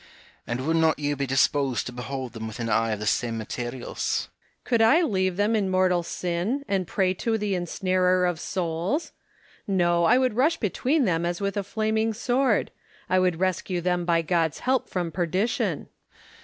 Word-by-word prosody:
HwfM. - - -24
And 120 +3 -3
would 160 +1 +1
not 160 -1 +3
you 145 0 -1
be 140 0 -2
disposed 135 -3 +1
to - - -5
behold 125 0 -5
them 110 -1 -6
with 110 +2 -8
an 115 -1 -2
eye 115 +1 +2
of 105 - -4
the 105 - -4
same 115 +2 0
materials? 120 +3 -3
Hom,e. - - -40
Could 235 -2 +1
I 275 +11 +5
leave 185 - 0
them 210 +2 +2
in 200 -3 +1
mortal 185 -1 +2
sin, 180 +11 -2
and 190 -3 0
pray 185 0 +1
to 225 +4 -1
the 205 -2 -1
ensnarer 185 +1 +1
of 175 -3 -1
souls? 180 - -2 0.6
No, 175 -3 +2
I 245 - +5
would 255 -3 +2
rush 295 +9 +2
between 260 - +1
them 170 -3 +1
as 175 0 -2
with 200 0 -2
a 205 - 0
flaming 220 +2 -1
sword; 245 0 +1 0.4
I 185 - +4
would 180 -3 +1
rescue 185 -1 -1
them 180 0 0
by 170 -1 +2
God's 165 -2 0
help 260 0 0
from 175 -3 -2
perdition. 185 +6 -1
180 Hz, 190 wpm, -25 LUFS, 160-210 Hz, 0.6 s, I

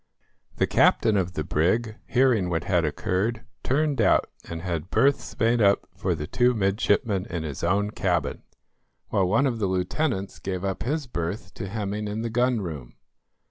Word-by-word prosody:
The - - +2
captain 110 - +3
of 90 -2 0
the - - -2
brig, 110 +8 +1
hearing 125 -8 +3
what 85 -1 -1
had 90 -3 +1
occurred, 105 +9 -1 0.2
turned 140 -1 +1
out, - - +3 0.2
and 85 0 -5
had 85 -1 -3
berths 140 +1 +1
made 115 +1 +3
up 100 -1 +3
for 95 -2 -1
the 75 -1 -4
two 125 +9 +2
midshipmen 100 -1 +1
in 85 -2 -4
his 75 -4 -6
own 100 +4 +1
cabin, - - -1 0.7
while 95 -2 +2
one 115 +9 +3
of 120 -4 -1
the 100 - +1
lieutenants 95 - -1
gave 95 -1 -4
up 95 -1 -2
his 145 +5 -1
berth 90 -4 -4
to 95 - -6
Hemming 105 0 -3
in 105 +2 -3
the 115 - -3
gun 125 -1 +2
room. 75 -9 -7
100 Hz, 175 wpm, -25 LUFS, 90-115 Hz, 0.7 s, captain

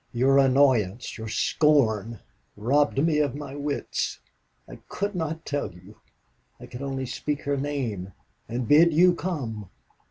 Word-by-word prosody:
Your 135 +3 +4
annoyance, 130 -5 +2
your 110 - -6
scorn, 115 -4 +1 0.4
robbed 140 +7 +1
me 150 +1 +2
of 145 -2 0
my 145 -2 -7
wits. 145 0 -3 0.5
I - - -10
could 200 +1 -3
not 160 -2 -4
tell 145 -7 -2
you. 90 +5 -16 0.6
I - - -10
could 125 +1 -9
only 135 -1 -3
speak 145 +3 -3
her 145 0 0
name 130 -10 -3 0.4
and 120 0 -3
bid 160 +5 +6
you 180 +2 +6
come. 120 - -4
135 Hz, 145 wpm, -25 LUFS, 115-150 Hz, 0.6 s, bid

